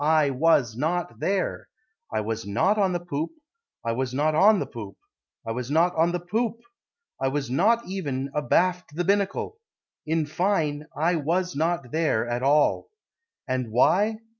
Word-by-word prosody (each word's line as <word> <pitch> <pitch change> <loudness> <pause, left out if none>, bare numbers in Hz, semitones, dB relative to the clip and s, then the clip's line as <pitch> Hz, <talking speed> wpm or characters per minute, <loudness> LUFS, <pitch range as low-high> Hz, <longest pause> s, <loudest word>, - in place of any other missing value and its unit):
I 155 -2 +3
was 135 -5 +2
not 165 +7 -2
there; 195 -2 -1 0.4
I 110 - 0
was 110 +1 -3
not 190 - +1
on 195 -2 +3
the 175 - -1
poop, 160 - -3 0.5
I 115 - +1
was 130 +2 -2
not 155 +3 +2
on 205 +7 +6
the - - -1
poop, 105 -4 -9 0.5
I 115 - -3
was 125 +2 -4
not 165 +4 +3
on 165 +2 +3
the 180 - -1
poop, 215 +6 -1 0.7
I 135 - +2
was 135 -2 -2
not 225 - +3
even 140 -8 -3
abaft 175 +2 +1
the 175 - 0
binnacle, 200 - 0 0.5
In 160 0 +1
fine, 155 -2 -1
I 165 +3 +2
was 175 +3 -1
not 160 -4 -1
there 155 -8 +1
at 120 +1 -2
all. 145 - +2 0.6
And 130 -2 -1
why? 205 - +3
155 Hz, 165 wpm, -25 LUFS, 130-180 Hz, 0.7 s, on